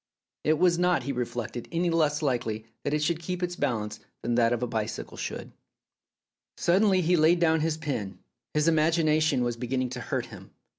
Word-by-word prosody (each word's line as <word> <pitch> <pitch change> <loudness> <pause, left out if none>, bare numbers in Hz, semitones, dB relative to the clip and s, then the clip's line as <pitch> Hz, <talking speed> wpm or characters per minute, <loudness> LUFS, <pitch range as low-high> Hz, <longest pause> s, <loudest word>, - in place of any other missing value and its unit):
It 155 +1 +3
was 175 0 +3
not, 180 -6 +2
he 140 - -2
reflected, 120 -2 -4
any 170 +1 +1
less 155 -2 +1
likely 115 -5 -1 0.2
that 145 - -1
it 150 - 0
should 160 +1 0
keep 180 +2 -4
its 175 0 -2
balance 110 -9 -2 0.2
than 120 - 0
that 115 -1 +3
a 120 - +2
bicycle 115 -2 -3
should.... - - -5 1.1
Suddenly 190 +2 +3
he 175 +1 +3
laid 165 +2 +4
down 160 -1 +3
his 155 0 0
pen. 130 -11 -4 0.4
His 150 +1 +2
imagination 155 -3 +3
was 120 -1 -1
beginning 130 +1 -1
to 125 0 -6
hurt - - -2
him. - - -13
150 Hz, 180 wpm, -27 LUFS, 120-165 Hz, 1.1 s, laid